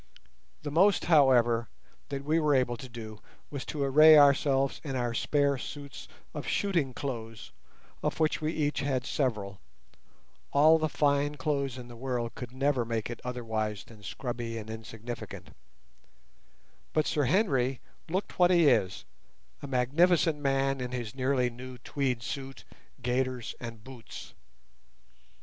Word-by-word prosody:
The 145 - -4
most, 190 +6 +4
however, 125 -7 +4 0.4
that 140 -1 -4
we 155 +2 +2
were 150 -2 +3
able 125 -2 +2
to 130 +2 -10
do 110 -2 -9 0.3
was 140 -2 -4
to 145 -2 -3
array 155 +3 +8
ourselves 140 -1 +4
in 140 -4 -4
our 120 -2 -1
spare 140 +2 +1
suits 140 -1 -8 0.3
of - - -6
shooting 170 -10 0
clothes, 115 -4 -6 0.5
of - - -2
which 155 0 +1
we 155 +1 0
each 150 -2 -1
had 135 -3 -1
several, 105 -10 -2 0.9
all 155 +3 +6
the 155 0 0
fine 145 0 +1
clothes 140 -2 -1
in 125 -1 -8
the 120 - -11
world 120 -2 -3
could 125 -1 -7
never 135 -1 +1
make 115 0 -3
it 120 - -7
otherwise 110 -4 -3
than 110 -3 -16
scrubby 115 +2 -5
and 110 0 -7
insignificant; 110 +1 -8 1.4
but 155 - +2
Sir 145 -2 +1
Henry 135 - +2 0.3
looked 185 +3 -3
what 175 -1 +6
he 170 -4 +5
is, 95 -7 +1 0.6
a 140 - -6
magnificent 150 +5 +3
man 135 -1 +1
in 125 0 -4
his 120 -4 -4
nearly 130 -1 +1
new 125 +1 -9
tweed 125 -1 -2
suit, 135 0 -6 0.4
gaiters, 125 -1 -1
and 115 -3 -8
boots. 125 -4 -10
130 Hz, 145 wpm, -29 LUFS, 120-145 Hz, 1.4 s, array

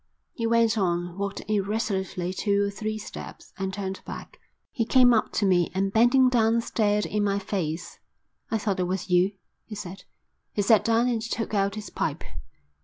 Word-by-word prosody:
He 230 -2 -2
went 230 -1 +3
on, 175 -2 -1
walked 200 0 -4
irresolutely 195 -3 -1
two 200 +1 +1
or 200 - 0
three 215 +1 -3
steps, 215 - -9
and 190 0 -2
turned 190 -1 -4
back. - - -9 0.3
He 235 - 0
came 245 +1 +5
up 220 - +1
to 205 - +1
me 180 -3 +3
and 195 +1 0
bending 245 +3 +5
down 230 -2 +3
stared 210 -2 +1
in 210 0 -1
my 200 -1 +1
face. 180 -4 -4 0.5
"I 225 - +1
thought 205 -3 -1
it 180 - +1
was 185 0 -3
you," 180 +3 +4 0.3
he 215 - -9
said. 190 -2 -8 0.5
He 205 - 0
sat 215 +1 +5
down 230 +1 +3
and 235 -3 0
took 225 0 -3
out 200 0 +1
his 215 -1 -7
pipe. - - -2
205 Hz, 180 wpm, -26 LUFS, 190-225 Hz, 0.5 s, came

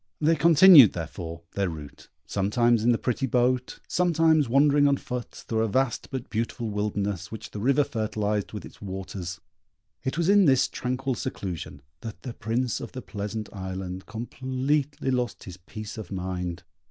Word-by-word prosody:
They 160 +2 +3
continued, 160 - +8
therefore, 85 0 -6
their 100 -2 -1
route, 75 -3 -10 0.2
sometimes 115 +3 +2
in 120 - +4
the 115 - +3
pretty 130 +3 -1
boat, 125 +1 +1
sometimes 165 -5 +3
wandering 145 +2 +5
on 140 -1 +3
foot 125 -2 -5
through 110 -1 -3
a 115 - +2
vast, 130 +3 0
but 130 -3 -5
beautiful 115 0 -3
wilderness, 100 -3 -2
which 110 - -8
the 105 - -6
river 135 +6 +3
fertilized 105 -4 -2
with 105 - -7
its - - -14
waters. 95 -2 -6 0.6
It 130 +3 -2
was 170 -1 +1
in 200 0 +6
this 135 -2 +4
tranquil 130 +2 -2
seclusion 90 - -5 0.2
that 110 -3 -8
the 125 - -5
Prince 115 +3 -1
of - - -7
the 130 - -6
Pleasant 105 +1 -5
Island 95 -1 -6
completely 130 +5 -2
lost 125 -2 -2
his 90 -2 -9
peace 110 +4 -8
of 110 - -8
mind. 90 -2 -4
115 Hz, 165 wpm, -26 LUFS, 100-130 Hz, 0.6 s, continued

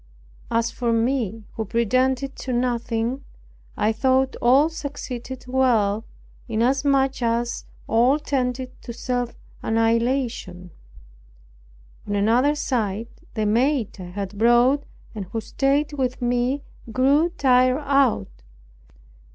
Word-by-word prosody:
As 230 0 +1
for 240 -2 -1
me 230 -2 0
who 220 - -3
pretended 255 +5 +1
to 260 - -5
nothing, 240 +1 -1 0.5
I 215 - +2
thought 260 +3 +2
all 265 +5 +5
succeeded 265 -5 -6
well, 230 -5 +2 0.4
inasmuch 270 +3 +1
as 235 0 -1 0.2
all 245 +5 +4
tended 255 -3 -2
to 235 - -7
self 245 0 -2 0.3
annihilation. 225 -5 0 1.4
On 205 - -1
another 240 +8 +3
side, 230 -6 -2 0.3
the 215 -2 0
maid 240 +2 +1
I - - -6
had 195 +2 -6
brought, 240 +5 +4 0.3
and 210 -4 -5
who 225 +5 -4
stayed 280 +6 0
with 255 -3 -2
me, 245 +3 0 0.3
grew 280 +7 +3
tired 255 +1 +4
out. 250 - +1
245 Hz, 110 wpm, -23 LUFS, 225-265 Hz, 1.4 s, all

